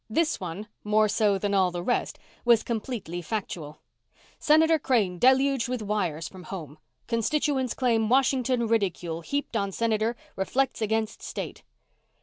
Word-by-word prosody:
This 310 +7 +1
one, 185 +4 -6 0.2
more 215 +1 +3
so 205 -1 +2
than 200 +1 -1
all 190 -2 +4
the 175 0 -5
rest, 245 - -1 0.3
was 235 -2 +5
completely 220 -7 -4
factual: 170 -6 -5 0.6
SENATOR 320 +1 +4
CRANE 210 -11 +1
DELUGED 265 0 +4
WITH 250 -3 -3
WIRES 180 -7 -1
FROM 185 -2 -11
HOME 155 -6 -8 0.3
CONSTITUENTS 260 +3 0
CLAIM 230 -4 +1
WASHINGTON 255 -2 +2
RIDICULE 180 -7 -1
HEAPED 280 - -3
ON 200 -2 0
SENATOR 225 +2 0 0.2
REFLECTS 255 +6 0
AGAINST 220 0 -1
STATE. - - -6
220 Hz, 135 wpm, -27 LUFS, 190-255 Hz, 0.6 s, was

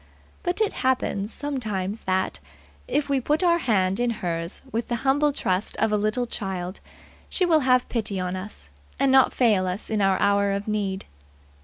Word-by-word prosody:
But 360 +2 -1
it 430 - +2
happens 235 -5 0
sometimes 220 -8 -3
that, 185 - 0 0.5
if 290 -1 0
we 275 -2 +1
put 300 +7 +1
our 340 -1 +4
hand 195 - +1
in 245 0 +2 0.2
hers 165 +1 -3
with 230 +1 -2
the 240 - -1
humble 290 +2 +3
trust 190 -7 -1
of 220 -1 +1
a - - +3
little 215 +4 0
child, 190 -5 -4 0.5
she 370 - +1
will 325 -3 +4
have 255 -2 +3
pity 210 -5 -2
on 180 0 -2
us, 185 - -8 0.3
and 275 -1 +3
not 265 -1 +6
fail 210 -7 +3
us 185 +5 -4
in 215 -1 +1
our 195 -1 +3
hour 200 0 +3
of 200 +1 -3
need. 200 -3 -2
215 Hz, 180 wpm, -25 LUFS, 190-260 Hz, 0.5 s, not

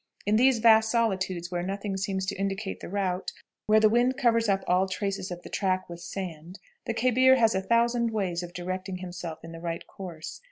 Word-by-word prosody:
"In 205 +2 +2
these 255 +2 +5
vast 220 -1 +5
solitudes, 190 -6 0
where 175 -1 -1
nothing 195 +2 -3
seems 190 0 -2
to 190 - -3
indicate 195 +1 -3
the - - -8
route, 190 -1 -2 0.4
where 215 0 +6
the 215 - +6
wind 240 +4 +2
covers 230 -4 +2
up 195 -1 +1
all 185 +2 +2
traces 195 0 -3
of 175 -1 -7
the - - -9
track 185 -2 0
with 170 0 -8
sand, 175 -1 -7 0.3
the - - 0
khebir 255 +2 +5
has 225 -3 +3
a 190 - 0
thousand 235 +2 +2
ways 190 -6 -1
of 175 -1 -7
directing 185 +1 -4
himself 175 -3 -7
in 165 - -9
the 165 - -8
right 170 0 -4
course. 170 -5 -8
195 Hz, 205 wpm, -27 LUFS, 180-220 Hz, 0.4 s, where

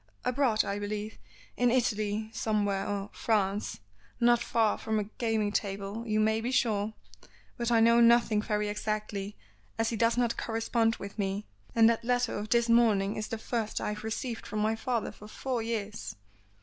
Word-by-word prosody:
"Abroad, 250 -4 +2
I 200 +1 -2
believe. 210 +1 -4 0.4
In 245 0 +3
Italy, 215 -3 0
somewhere, 205 -4 0
or 205 0 -3
France 205 - 0 0.4
not 240 0 +4
far 225 -2 +1
from 220 -1 -1
a 210 - +1
gaming 220 0 -1
table, 200 +3 -3
you 215 0 +1
may 220 +1 +2
be 235 - -2
sure. 220 -4 +1 0.6
But 235 -1 -2
I 230 -1 +5
know 235 +1 +6
nothing 235 -2 +5
very 210 -1 -1
exactly, 210 -1 -3 0.4
as 225 0 +1
he 230 - -2
does 230 +2 +2
not 240 -1 +1
correspond 225 0 0
with 200 +2 -9
me, 195 +1 -1 0.3
and 225 -1 +7
that 230 0 +2
letter 245 0 +1
of 210 +1 -6
this 235 0 +3
morning 220 -4 +3
is 215 0 -3
the 225 - -4
first 220 -1 -2
I - - -2
have 210 0 -5
received 225 +2 -4
from 215 - -4
my 215 +1 +1
father 235 0 -2
for 210 - -13
four 250 +2 -3
years." 220 -2 -4
220 Hz, 175 wpm, -30 LUFS, 210-235 Hz, 0.6 s, and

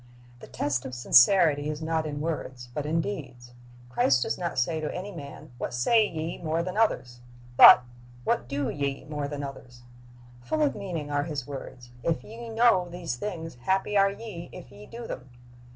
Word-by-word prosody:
"^ - - -24
The - - -12
test 135 -4 -2
of 130 - -6
sincerity 145 +4 +5
is 150 -1 -4
not 160 0 -1
in 145 -1 -4
words, 130 -6 -4
but 150 +2 -3
in 165 +2 +1
deeds. 130 -10 -7 0.3
Christ 125 +1 +2
does - - -1
not 170 -2 -4
say 155 +6 0
to 155 - -3
any 190 +3 -5
man, 145 -3 -10
What - - -4
say 215 - +4
ye 160 -1 -5
more 165 0 -1
than 185 +2 -5
others? 125 - 0 0.4
but, 125 - +10 0.4
"What 120 - 0
do 140 -1 -1
ye 140 -1 -3
more 150 -2 -4
than 145 0 -5
others?"'' 125 -3 -9 0.6
Full 310 - 0
of 290 - +2
meaning 175 -8 -5
are 145 0 0
His 150 -6 -4
words, 130 -3 -9
"If 165 +4 -1
ye 230 +2 -9
know 225 -6 +3
these 170 -6 -4
things, 165 -2 -5
happy 190 +8 0
are 195 0 +5
ye 200 -4 -8
if 180 - -11
ye 105 +1 -13
do 235 0 -8
them." 130 - -7
155 Hz, 190 wpm, -27 LUFS, 135-185 Hz, 0.6 s, but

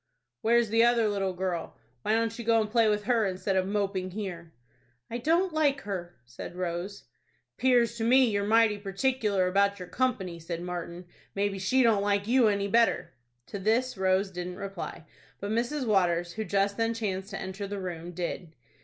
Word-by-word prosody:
"Where's 235 0 +3
the 225 +1 +4
other 235 -2 +4
little 195 -2 -1
girl? 180 -2 -3 0.2
Why 215 - 0
don't 225 0 0
you - - -4
go 230 0 +3
and 215 -1 -2
play 230 -2 +4
with 210 0 0
her, 230 +1 +2
instead 190 +1 -2
of 185 0 +1
moping 195 -2 -1
here?" 180 -4 -6 0.6
"I 235 - -3
don't 335 +7 +2
like 290 -3 +2
her," 175 -4 -5
said 120 +8 -9
Rose. 180 +2 -4 0.5
"'Pears 245 -2 +3
to 225 - -2
me 255 +3 +5
you're 205 -4 0
mighty 215 0 +3
particular 200 -1 0
about 200 +2 +2
your 180 - -8
company," 190 -8 -1
said 170 +1 -5
Martin. 175 0 -6 0.3
"Maybe 200 -1 -1
she 255 +8 +3
don't 220 -4 +4
like 200 0 +1
you 245 -1 +4
any 200 -1 +1
better." 230 - +2 0.3
To 200 - -6
this 230 +6 +1
Rose 190 0 +1
didn't 180 0 -5
reply; 195 -5 -6 0.3
but 200 +1 -4
Mrs. 245 +5 -1
Waters, 175 -5 +1
who 220 +2 -4
just 200 0 +1
then 230 0 0
chanced 195 -3 -3
to 195 - -5
enter 195 +2 -5
the 205 +1 -5
room, 175 -2 -5
did. 175 -1 -5
200 Hz, 185 wpm, -28 LUFS, 185-230 Hz, 0.6 s, me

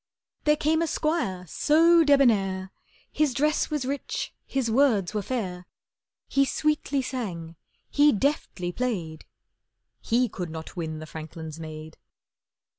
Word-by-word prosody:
There 300 0 +5
came 315 +2 +2
a 335 - +1
squire 305 - -1
so 330 - +4
debonair, 200 -10 +3 0.4
His 300 -5 +1
dress 300 +4 +1
was 295 -4 -2
rich, 275 +1 -3
his 260 -4 -1
words 220 -7 +3
were 210 - 0
fair. 185 -6 -4 0.6
He 275 - +3
sweetly 285 -1 0
sang, 180 -11 -5 0.3
he 290 +1 +5
deftly 210 -8 -1
played— 175 -9 -3 0.8
He 245 +2 +2
could 180 -5 -5
not 160 0 -8
win 160 -3 -4
the 155 - -7
franklin's 160 0 -8
maid. 155 0 -9
230 Hz, 125 wpm, -26 LUFS, 175-285 Hz, 0.8 s, There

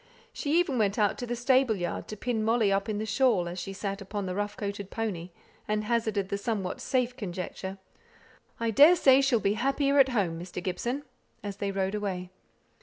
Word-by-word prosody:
She 300 +4 +1
even 295 -9 +1
went 200 -2 +1
out 210 -2 +3
into 245 - -6
the 240 - -2
stable 255 -1 +3
yard 175 -3 -4
to 215 - -7
pin 230 -1 -1
Molly 225 -2 +3
up 195 +2 0
in 210 - -1
the 215 - -2
shawl, 215 -4 +2
as 175 +2 -5
she 195 - -5
sate 195 +1 -4
upon 200 +1 -4
the 185 - -3
rough 205 +2 -3
coated 200 -1 -4
pony, 195 -7 -3 0.4
and 210 0 0
hazarded 215 -3 0
the 200 - -2
somewhat 200 -4 -3
safe 250 -1 0
conjecture, 190 -1 -5 0.8
"I 230 -1 0
daresay 280 - +7
she'll 270 -4 +3
be 200 0 +1
happier 275 +4 +2
at 270 -1 +6
home, 190 -9 0
Mr. 175 +1 -9
Gibson," 240 +10 -2 0.4
as 200 -1 -5
they 200 -1 -2
rode 195 0 -1
away. 190 -3 -3
210 Hz, 195 wpm, -28 LUFS, 195-245 Hz, 0.8 s, daresay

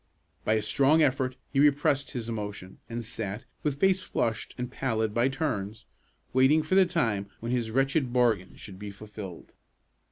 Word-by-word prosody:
By 110 - +2
a 110 -1 +1
strong 140 +8 +4
effort, 130 -2 +1 0.2
he 135 - +2
repressed 145 -1 +3
his 120 -5 -5
emotion, 105 -4 -5
and 120 0 -4
sat, 105 -1 -5 0.2
with 145 -2 -1
face 190 +1 +4
flushed 115 - -2
and 125 0 -4
pallid 110 -5 -1
by 120 +3 +3
turns, 115 -7 -3 0.5
waiting 135 +5 +5
for 155 - -2
the 190 -1 +6
time 105 - 0
when 115 +1 -4
his 120 -3 0
wretched 135 +2 +1
bargain 115 -7 +2
should 95 -2 -11
be 105 0 -6
fulfilled. 100 -3 -9
120 Hz, 165 wpm, -28 LUFS, 105-135 Hz, 0.5 s, the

